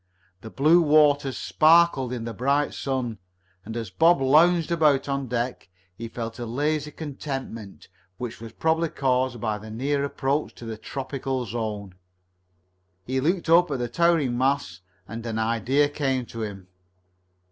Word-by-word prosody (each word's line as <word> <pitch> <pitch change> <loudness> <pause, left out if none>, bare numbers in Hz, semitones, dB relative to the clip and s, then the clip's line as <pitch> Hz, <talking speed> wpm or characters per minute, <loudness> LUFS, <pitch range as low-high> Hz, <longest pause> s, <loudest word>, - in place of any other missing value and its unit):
The 110 - -9
blue 155 +8 +4
waters 145 -4 +3
sparkled 155 -5 +4
in 120 -2 -4
the 115 - -5
bright 140 +6 0
sun, 125 -6 -3 0.4
and 110 +2 -6
as 115 -5 -5
Bob 165 - +4
lounged 160 +5 +4
about 150 -5 +3
on 140 -1 -2
deck 120 -3 -3 0.3
he 115 +4 -6
felt 115 0 -6
a 120 - -4
lazy 150 +5 -1
contentment 135 -8 -7 0.3
which 120 -1 -6
was 115 -1 -8
probably 160 +5 0
caused 130 -3 0
by 110 -2 -2
the 110 +1 -10
near 140 +6 -1
approach 140 +1 -2
to 120 - -11
the 115 -1 -5
tropical 130 +2 -4
zone. 105 -3 -4 1.1
He 130 +3 -1
looked 170 +6 0
up 175 +2 +5
at 140 - -1
the 120 -1 -2
towering 165 -7 +2
masts, 130 -9 0 0.3
and 115 +2 -7
an 115 -1 -4
idea 115 +6 +2
came 135 -3 -1
to 115 0 -8
him. 100 -4 -6
130 Hz, 155 wpm, -25 LUFS, 115-145 Hz, 1.1 s, up